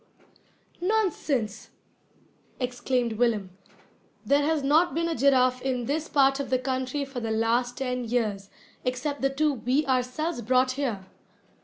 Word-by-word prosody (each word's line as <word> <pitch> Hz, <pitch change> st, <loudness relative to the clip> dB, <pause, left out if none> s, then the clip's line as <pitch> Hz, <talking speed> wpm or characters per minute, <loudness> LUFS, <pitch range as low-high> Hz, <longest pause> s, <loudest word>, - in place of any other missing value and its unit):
"Nonsense!" 320 Hz, -, -1 dB, 0.9 s
exclaimed 245 Hz, -1 st, -1 dB
Willem. 215 Hz, -6 st, +1 dB, 0.7 s
"There 285 Hz, +1 st, +3 dB
has 300 Hz, 0 st, +1 dB
not 300 Hz, +2 st, +3 dB
been 335 Hz, +1 st, 0 dB
a 335 Hz, -, -1 dB
giraffe 255 Hz, -2 st, +3 dB
in 255 Hz, -2 st, -1 dB
this 300 Hz, +5 st, -2 dB
part 275 Hz, -1 st, +3 dB
of 280 Hz, -, -3 dB
the 255 Hz, -, +3 dB
country 260 Hz, +2 st, -2 dB
for 270 Hz, -2 st, -6 dB
the 225 Hz, -2 st, -3 dB
last 230 Hz, +3 st, +1 dB
ten 250 Hz, -2 st, -2 dB
years, 215 Hz, -4 st, -1 dB, 0.3 s
except 260 Hz, +3 st, -2 dB
the 270 Hz, -, +3 dB
two 295 Hz, +2 st, +1 dB
we 260 Hz, +4 st, 0 dB
ourselves 260 Hz, +4 st, -1 dB
brought 255 Hz, +3 st, +2 dB
here." 255 Hz, -8 st, -3 dB
255 Hz, 140 wpm, -26 LUFS, 245-285 Hz, 0.9 s, There